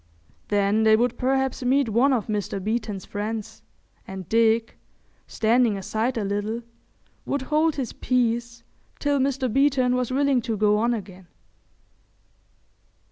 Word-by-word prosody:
Then 205 Hz, +1 st, +2 dB
they 220 Hz, 0 st, +5 dB
would 240 Hz, +2 st, +1 dB
perhaps 265 Hz, +1 st, 0 dB
meet 265 Hz, +1 st, +2 dB
one 235 Hz, +6 st, +3 dB
of 240 Hz, -6 st, +1 dB
Mr. 205 Hz, -2 st, -3 dB
Beeton's 210 Hz, -1 st, -3 dB
friends, 220 Hz, +1 st, -5 dB, 0.5 s
and 190 Hz, -2 st, -7 dB
Dick, 225 Hz, 0 st, +2 dB, 0.5 s
standing 225 Hz, -1 st, +2 dB
aside 220 Hz, +6 st, -2 dB
a 220 Hz, -, -1 dB
little, 205 Hz, +4 st, -2 dB, 0.6 s
would 280 Hz, -1 st, -2 dB
hold 310 Hz, +3 st, +1 dB
his 260 Hz, -5 st, -4 dB
peace 235 Hz, -1 st, -1 dB, 0.3 s
till 285 Hz, -1 st, 0 dB
Mr. 270 Hz, -1 st, 0 dB
Beeton 260 Hz, 0 st, +2 dB
was 250 Hz, -1 st, -1 dB
willing 270 Hz, -1 st, +2 dB
to 225 Hz, -2 st, -3 dB
go 210 Hz, 0 st, +3 dB
on 235 Hz, +2 st, +1 dB
again. 190 Hz, -4 st, -9 dB
230 Hz, 135 wpm, -24 LUFS, 210-255 Hz, 0.6 s, they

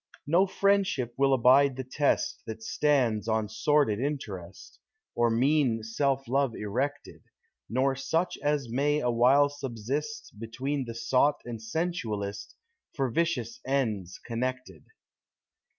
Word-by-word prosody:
No 175 Hz, +6 st, +3 dB
friendship 195 Hz, -, +1 dB
will 135 Hz, 0 st, +3 dB
abide 135 Hz, +2 st, +5 dB
the 130 Hz, -, -4 dB
test, 140 Hz, +3 st, 0 dB
That 110 Hz, 0 st, -7 dB
stands 120 Hz, -6 st, +1 dB
on 110 Hz, -1 st, 0 dB
sordid 110 Hz, 0 st, +2 dB
interest, 105 Hz, -, -5 dB, 0.3 s
Or 120 Hz, 0 st, +2 dB
mean 125 Hz, -1 st, +2 dB
self 135 Hz, +4 st, -1 dB
love 135 Hz, -1 st, +1 dB
erected; 130 Hz, +8 st, -3 dB, 0.5 s
Nor 135 Hz, +3 st, +1 dB
such 160 Hz, +7 st, -1 dB
as 145 Hz, -3 st, 0 dB
may 145 Hz, +5 st, +1 dB
awhile 125 Hz, +3 st, +4 dB
subsist, 145 Hz, -, -5 dB
Hetween 130 Hz, +4 st, -3 dB
the 115 Hz, -, -6 dB
sot 125 Hz, +5 st, +2 dB
and 115 Hz, -2 st, -6 dB
sensualist, 110 Hz, -, -3 dB, 0.4 s
For 135 Hz, -3 st, -1 dB
vicious 125 Hz, -6 st, -1 dB
ends 110 Hz, -10 st, -1 dB
connected. 130 Hz, +2 st, -4 dB
130 Hz, 120 wpm, -28 LUFS, 115-145 Hz, 0.5 s, abide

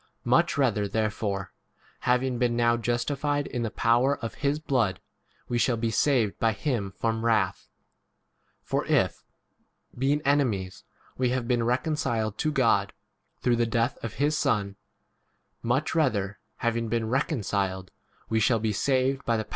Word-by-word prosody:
Much -, -, +3 dB
rather 110 Hz, -7 st, +2 dB
therefore, 105 Hz, -2 st, -2 dB, 0.6 s
hav 125 Hz, +1 st, +4 dB
ing 130 Hz, -2 st, -2 dB
been 120 Hz, -2 st, +1 dB
now 120 Hz, 0 st, +3 dB
justified 140 Hz, +5 st, -1 dB
in 120 Hz, -, -4 dB
[the 115 Hz, -, -1 dB
power 120 Hz, +6 st, +2 dB
of] 115 Hz, -, -5 dB
his 145 Hz, +1 st, +1 dB
blood, 125 Hz, -10 st, 0 dB, 0.5 s
we 120 Hz, -, -1 dB
shall 120 Hz, -1 st, +2 dB
be 115 Hz, 0 st, 0 dB
10 -, -, -7 dB
saved 120 Hz, -6 st, +2 dB
by 115 Hz, -1 st, +2 dB
him 105 Hz, -4 st, -2 dB
from 115 Hz, 0 st, -1 dB
wrath. 110 Hz, -5 st, +1 dB, 0.9 s
For -, -, -1 dB
if, -, -, +1 dB, 0.7 s
being 140 Hz, +4 st, +1 dB
enemies, 115 Hz, -10 st, 0 dB, 0.4 s
we 125 Hz, -1 st, +2 dB
have 125 Hz, -1 st, -1 dB
been 120 Hz, -2 st, +1 dB
reconciled 120 Hz, -4 st, -1 dB
to 155 Hz, -, +1 dB
God 115 Hz, -8 st, +2 dB, 0.5 s
through 120 Hz, -2 st, +2 dB
the 120 Hz, 0 st, +2 dB
death 115 Hz, +2 st, -1 dB
of 115 Hz, -3 st, -4 dB
his 145 Hz, +2 st, +1 dB
Son, 100 Hz, -8 st, 0 dB, 0.9 s
much 130 Hz, +6 st, 0 dB
rather, 105 Hz, -11 st, 0 dB, 0.2 s
having 115 Hz, -1 st, -1 dB
been 115 Hz, -1 st, 0 dB
reconciled, 100 Hz, -, -1 dB, 0.4 s
we 110 Hz, -, +1 dB
shall 115 Hz, +1 st, +3 dB
h 110 Hz, +5 st, -1 dB
Or 130 Hz, 0 st, +3 dB
'died. 115 Hz, -2 st, 0 dB
120 Hz, 150 wpm, -27 LUFS, 110-130 Hz, 0.9 s, hav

